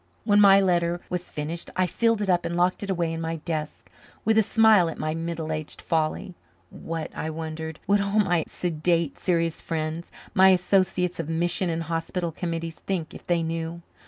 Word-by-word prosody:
When 205 Hz, 0 st, +4 dB
my 195 Hz, -1 st, +8 dB
letter 175 Hz, -2 st, +1 dB
was 180 Hz, 0 st, -3 dB
finished 155 Hz, +3 st, -5 dB
I 185 Hz, -, +2 dB
sealed 230 Hz, +3 st, +1 dB
it -, -, -3 dB
up 175 Hz, -1 st, +3 dB
and 170 Hz, 0 st, -3 dB
locked 180 Hz, +1 st, +1 dB
it 200 Hz, -, -5 dB
away 170 Hz, -3 st, 0 dB
in 165 Hz, -, -4 dB
my 165 Hz, 0 st, -2 dB
desk 155 Hz, -1 st, -5 dB, 0.4 s
with 220 Hz, -, +3 dB
a 220 Hz, -, +6 dB
smile 215 Hz, -5 st, +5 dB
at -, -, -7 dB
my 155 Hz, 0 st, -2 dB
middle 165 Hz, -1 st, -4 dB
aged 155 Hz, -1 st, -5 dB
folly. 165 Hz, +4 st, -1 dB, 0.4 s
What, 165 Hz, -1 st, -6 dB
I 160 Hz, -, -3 dB
wondered, 160 Hz, 0 st, -5 dB
would 205 Hz, 0 st, +3 dB
all 200 Hz, +1 st, -1 dB
my 175 Hz, -6 st, +2 dB
sedate, 170 Hz, -2 st, -1 dB
serious 165 Hz, -3 st, 0 dB
friends, 160 Hz, +1 st, -3 dB, 0.2 s
my 190 Hz, 0 st, +7 dB
associates 180 Hz, -1 st, +2 dB
of 165 Hz, -1 st, -3 dB
mission 175 Hz, +2 st, 0 dB
and 165 Hz, 0 st, -2 dB
hospital 165 Hz, +1 st, -2 dB
committees 165 Hz, -1 st, -4 dB
think 180 Hz, -5 st, -3 dB
if -, -, -12 dB
they 170 Hz, -1 st, +2 dB
knew. 165 Hz, +1 st, -4 dB
170 Hz, 190 wpm, -25 LUFS, 165-185 Hz, 0.4 s, my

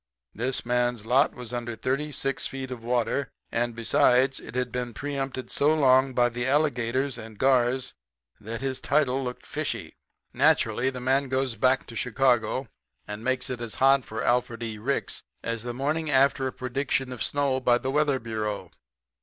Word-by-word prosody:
This 125 Hz, +4 st, -1 dB
man's 120 Hz, -2 st, 0 dB
lot 130 Hz, +5 st, +3 dB
was 125 Hz, -1 st, -7 dB
under 120 Hz, -1 st, -3 dB
thirty 140 Hz, +6 st, -2 dB
six 135 Hz, -1 st, -1 dB
feet 130 Hz, -1 st, -6 dB
of 120 Hz, -2 st, -6 dB
water, 125 Hz, +3 st, 0 dB, 0.2 s
and, 120 Hz, 0 st, -1 dB
besides, 125 Hz, +3 st, +3 dB
had 125 Hz, 0 st, -3 dB
been 125 Hz, -2 st, -4 dB
preempted 135 Hz, -2 st, -4 dB
so 150 Hz, +2 st, +3 dB
long 130 Hz, -3 st, +4 dB
by 120 Hz, -1 st, +4 dB
the 120 Hz, +1 st, -3 dB
alligators 135 Hz, -2 st, +1 dB
and 110 Hz, -1 st, -10 dB
gars 130 Hz, 0 st, +2 dB, 0.5 s
that 110 Hz, +3 st, -6 dB
his 135 Hz, -1 st, -3 dB
title 135 Hz, -3 st, +1 dB
looked 125 Hz, -1 st, -6 dB
fishy. -, -, -3 dB, 0.4 s
"Naturally, 130 Hz, -3 st, +3 dB
the 130 Hz, -1 st, -6 dB
man 135 Hz, +2 st, +1 dB
goes 130 Hz, -2 st, 0 dB
back 130 Hz, +4 st, +2 dB
to 115 Hz, -, -11 dB
Chicago 125 Hz, +1 st, +1 dB, 0.4 s
and 105 Hz, +1 st, -6 dB
makes 130 Hz, +1 st, 0 dB
it 125 Hz, -2 st, -4 dB
as 115 Hz, -2 st, -5 dB
hot 135 Hz, 0 st, +4 dB
for 110 Hz, 0 st, -5 dB
Alfred 120 Hz, -1 st, 0 dB
E. 110 Hz, -2 st, -4 dB
Ricks 135 Hz, +6 st, -1 dB, 0.2 s
as 115 Hz, -1 st, -2 dB
the 120 Hz, +1 st, -4 dB
morning 150 Hz, +5 st, -1 dB
after 135 Hz, -1 st, +3 dB
a -, -, -3 dB
prediction 130 Hz, +1 st, -2 dB
of 125 Hz, -, -7 dB
snow 140 Hz, -2 st, +1 dB
by 125 Hz, -2 st, +3 dB
the 130 Hz, +2 st, -3 dB
weather 145 Hz, -1 st, +2 dB
bureau. 105 Hz, -5 st, -4 dB
125 Hz, 170 wpm, -26 LUFS, 120-135 Hz, 0.5 s, long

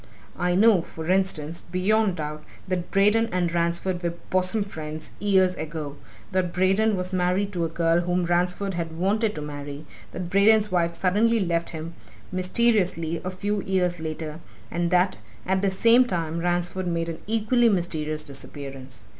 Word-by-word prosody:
I 180 Hz, 0 st, +1 dB
know 205 Hz, -2 st, +5 dB
for 160 Hz, +1 st, -5 dB
instance, 170 Hz, -4 st, 0 dB
beyond 190 Hz, +3 st, +1 dB
doubt, 150 Hz, -1 st, -5 dB, 0.2 s
that 180 Hz, -2 st, -2 dB
Braden 210 Hz, +3 st, +3 dB
and 175 Hz, -2 st, 0 dB
Ransford 170 Hz, +1 st, 0 dB
were 170 Hz, -1 st, -2 dB, 0.2 s
bosom 185 Hz, +3 st, +2 dB
friends, 155 Hz, -5 st, -7 dB
years 190 Hz, -2 st, +3 dB
ago, 155 Hz, -3 st, -5 dB, 0.4 s
that 185 Hz, -2 st, 0 dB
Braden 195 Hz, +4 st, +2 dB
was 180 Hz, +1 st, -3 dB
married 185 Hz, +3 st, +1 dB
to 170 Hz, -2 st, 0 dB
a -, -, -2 dB
girl 165 Hz, +1 st, +2 dB
whom 175 Hz, 0 st, 0 dB
Ransford 180 Hz, +3 st, 0 dB
had 165 Hz, -2 st, -4 dB
wanted 210 Hz, +4 st, +1 dB
to 155 Hz, -, -5 dB
marry, 145 Hz, 0 st, -7 dB, 0.3 s
that 175 Hz, 0 st, -6 dB
Braden's 210 Hz, +2 st, +4 dB
wife 170 Hz, -2 st, +1 dB
suddenly 210 Hz, +6 st, +2 dB
left 170 Hz, -3 st, 0 dB
him, 165 Hz, 0 st, -6 dB, 0.4 s
mysteriously, 185 Hz, -4 st, +1 dB
a 180 Hz, -, -2 dB
few 200 Hz, +2 st, -2 dB
years 180 Hz, -3 st, 0 dB
later, 155 Hz, 0 st, -5 dB, 0.3 s
and 170 Hz, 0 st, 0 dB
that, 180 Hz, +1 st, +2 dB, 0.3 s
at 190 Hz, +1 st, +1 dB
the 200 Hz, -, +2 dB
same 230 Hz, +6 st, +5 dB
time, 170 Hz, -6 st, -2 dB
Ransford 175 Hz, +1 st, -1 dB
made 170 Hz, -1 st, -1 dB
an 165 Hz, -1 st, -5 dB
equally 225 Hz, +2 st, +3 dB
mysterious 155 Hz, -5 st, -1 dB
disappearance. 135 Hz, -4 st, -8 dB
180 Hz, 160 wpm, -25 LUFS, 165-195 Hz, 0.4 s, know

